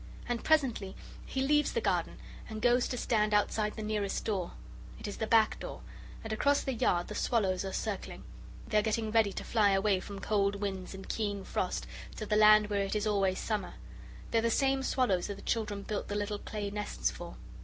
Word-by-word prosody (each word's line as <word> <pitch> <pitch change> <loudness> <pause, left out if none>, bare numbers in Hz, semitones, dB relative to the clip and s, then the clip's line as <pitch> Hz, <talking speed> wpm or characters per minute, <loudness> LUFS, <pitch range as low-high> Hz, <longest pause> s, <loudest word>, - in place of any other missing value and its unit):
And 240 -1 -2
presently 250 -11 +2 0.3
he 265 - -1
leaves 295 +2 +3
the 470 - +1
garden - - 0 0.3
and 220 -1 -5
goes 245 +2 +3
to 250 - -3
stand 215 -3 +2
outside 210 +1 +1
the 220 - -5
nearest 210 -2 -1
door. 195 -5 -2 0.5
It - - -6
is 205 - -5
the 220 - -2
back 220 -1 +4
door, - - -7 0.4
and 220 -1 -3
across 285 +6 +2
the 270 - -1
yard 175 -6 +1
the - - -6
swallows 200 -5 +1
are 195 - -4
circling. - - -4 0.4
They 215 - +3
are - - +3
getting 220 0 -1
ready 220 -2 +4
to - - -5
fly 210 -3 +3
away 195 0 +2
from 200 +2 -8
cold 200 0 +1
winds 195 -2 -4
and 195 - -9
keen 205 -3 -2
frost 180 - -2 0.3
to 215 - -5
the 210 - +1
land 215 0 +6
where 200 -1 +1
it 195 +1 -2
is 210 0 0
always 195 -3 +2
summer. 215 -2 -3 0.6
They 230 - +4
are - - +1
the 230 - +2
same 270 +3 +2
swallows 250 -9 +1
that 200 - -4
the 200 - -12
children 210 -3 -1
built 210 0 -3
the 205 - -3
little 205 0 -2
clay 205 -2 -4
nests 60 - -1
for. - - -9
210 Hz, 210 wpm, -31 LUFS, 200-225 Hz, 0.6 s, land